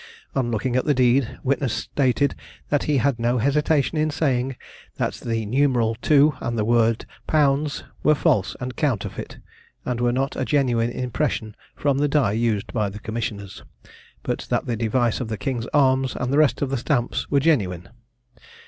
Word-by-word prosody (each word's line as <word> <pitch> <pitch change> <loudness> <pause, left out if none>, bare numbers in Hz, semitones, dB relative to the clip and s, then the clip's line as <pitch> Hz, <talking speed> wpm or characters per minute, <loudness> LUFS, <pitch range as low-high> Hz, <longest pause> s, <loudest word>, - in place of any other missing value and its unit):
On 130 -3 0
looking 120 +2 -1
at 130 - +1
the 145 - +2
deed, 125 0 +2
witness 135 -2 0
stated 140 +1 0 0.4
that 145 - +1
he 150 -2 +2
had 130 -1 +1
no 120 +2 +1
hesitation 150 +4 +1
in 155 0 +2
saying, 135 -4 0 0.4
that - - -1
the 115 -2 -3
numeral 120 -1 +2
"II" 150 0 +6
and 115 -1 -3
the 105 - 0
word 115 0 +2 0.2
"Pounds" 150 0 +1 0.2
were 150 - +4
false 100 -8 +1
and 125 0 -5
counterfeit, 130 -10 -2 0.5
and 120 -1 -2
were 120 0 +2
not 135 +3 -1
a - - -1
genuine 125 -5 +1
impression 125 -3 -2 0.2
from 140 -1 0
the 145 - +2
die 140 -7 +2
used 110 -2 -1
by 105 -4 0
the 100 - -9
commissioners; 105 -3 -5 0.6
but - - -3
that - - 0
the 120 - -1
device 115 +1 0
of 125 - -3
the 110 -1 -4
King's 125 -3 -3
arms 130 -2 +2
and 125 +2 -2
the 145 - +4
rest 150 -1 +3
of 135 - -2
the 135 - 0
stamps 120 -1 -1
were 140 - +3
genuine. 100 - +1
125 Hz, 175 wpm, -23 LUFS, 115-140 Hz, 0.6 s, II